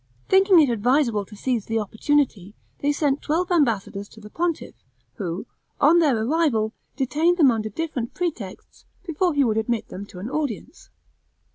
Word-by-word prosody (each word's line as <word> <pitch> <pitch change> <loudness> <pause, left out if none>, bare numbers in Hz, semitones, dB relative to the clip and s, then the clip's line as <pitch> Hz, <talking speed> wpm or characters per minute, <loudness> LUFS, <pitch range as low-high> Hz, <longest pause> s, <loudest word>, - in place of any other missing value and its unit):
Thinking 385 -1 +6
it 295 -4 +4
advisable 235 -1 +1
to 210 - -13
seize 235 0 -2
the 225 - -1
opportunity, 220 -2 0 0.2
they 290 - +1
sent 290 -1 0
twelve 350 +4 -1
ambassadors 215 - 0
to 220 - -15
the 210 0 -12
pontiff, 340 -1 -2 0.4
who, 180 +2 -4 0.3
on 315 +5 +5
their 290 -8 +3
arrival, 245 -7 +1 0.2
detained 310 +6 +1
them 285 -7 +6
under 215 -2 -2
different 250 -2 -4
pretexts 285 - -5 0.2
before 340 0 0
he 285 - +4
would 220 -4 +1
admit 225 +1 -1
them 200 +2 -8
to 185 - -13
an 190 +5 -6
audience. 285 - -4
260 Hz, 160 wpm, -23 LUFS, 215-315 Hz, 0.4 s, Thinking